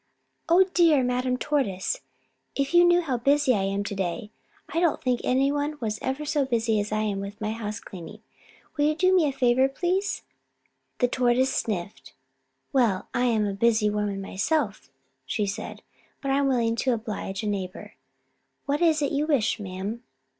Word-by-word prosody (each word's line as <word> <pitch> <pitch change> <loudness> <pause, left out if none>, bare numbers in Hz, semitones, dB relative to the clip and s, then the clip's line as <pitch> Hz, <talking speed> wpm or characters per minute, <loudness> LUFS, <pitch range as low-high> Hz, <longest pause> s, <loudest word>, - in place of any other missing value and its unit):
Oh, 350 +3 +7
dear 320 -6 +5
Madame 250 0 0
Tortoise, 225 -11 -1 0.5
if 275 +3 -1
you 345 0 +7
knew 350 0 +5
how 270 -7 -1
busy 275 +2 +3
I 195 -3 0
am 195 +1 -1
to 205 - -4
day. 195 +3 -3 0.4
I 330 - -1
don't 340 -3 +2
think 250 -2 0
any 270 +2 +2
one 290 +1 -2
was 215 -2 -3
ever 265 +3 -2
so 295 -1 +1
busy 230 -4 +1
as 205 +1 -3
I 215 0 0
am 205 -2 -1
with 200 +1 -7
my 215 0 -2
house 220 -1 -4
cleaning. 195 +3 -10 0.5
Will 290 - +2
you 305 +1 +2
do 370 +3 +3
me 335 -5 +4
a - - 0
favor, 260 0 +3
please?" 365 +7 -1 0.7
The 245 - +3
Tortoise 250 +1 +2
sniffed. 200 -3 -4 0.6
"Well, 230 -8 +2
I 245 - +1
am 225 -3 +2
a 200 - -1
busy 215 0 +2
woman 205 -2 -2
myself," 200 - -1 0.3
she 205 +10 -1
said, 205 +2 -6 0.4
"but 275 - -2
I 270 - +3
am 280 - +2
willing 235 -3 +1
to 255 +1 +1
oblige 215 -3 -4
a - - -2
neighbor. 190 -3 -4 0.7
What 285 +2 0
is 315 -3 +3
it 285 - 0
you 295 +2 0
wish, 245 -10 +1
ma'am?" 200 +3 -5
240 Hz, 180 wpm, -26 LUFS, 210-285 Hz, 0.7 s, Oh